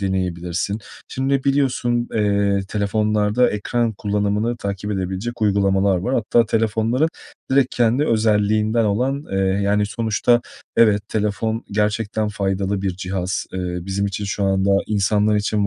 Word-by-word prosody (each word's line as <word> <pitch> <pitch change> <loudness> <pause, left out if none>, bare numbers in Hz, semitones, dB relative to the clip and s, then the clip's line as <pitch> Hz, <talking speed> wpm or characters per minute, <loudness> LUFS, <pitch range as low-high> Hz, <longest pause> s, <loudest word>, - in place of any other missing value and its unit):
deneyebilirsin. 95 0 -2 0.3
Şimdi, 135 0 -1
biliyorsun, 125 -4 +1
eee, 100 -2 +2
telefonlarda 105 +3 +1
ekran 115 +3 -1
kullanımını 105 +3 -1
takip 100 0 -4
edebilecek 95 +5 -3
uygulamalar 100 -1 +2
var 110 +9 -1
hatta 115 0 +2
telefonların 115 +6 +1 0.4
direkt 135 -1 +2
kendi 120 +4 +2
özelliğinden 110 0 +2
olan, 130 +8 0
eee 95 - 0
yani, 100 +2 +1
sonuçta 115 +2 +1 0.4
evet, 105 -3 +3
telefon 110 +2 -1
gerçekten 105 +1 0
faydalı 95 -1 -1
bir 95 -3 -2
cihaz. 95 0 -3
Eee, 90 -1 -3
bizim 95 +3 -2
için 100 +1 -4
şu 100 0 -2
anda, 95 0 +2 0.2
insanlar 105 +1 +2
için 105 0 0
105 Hz, 125 wpm, -21 LUFS, 100-115 Hz, 0.4 s, evet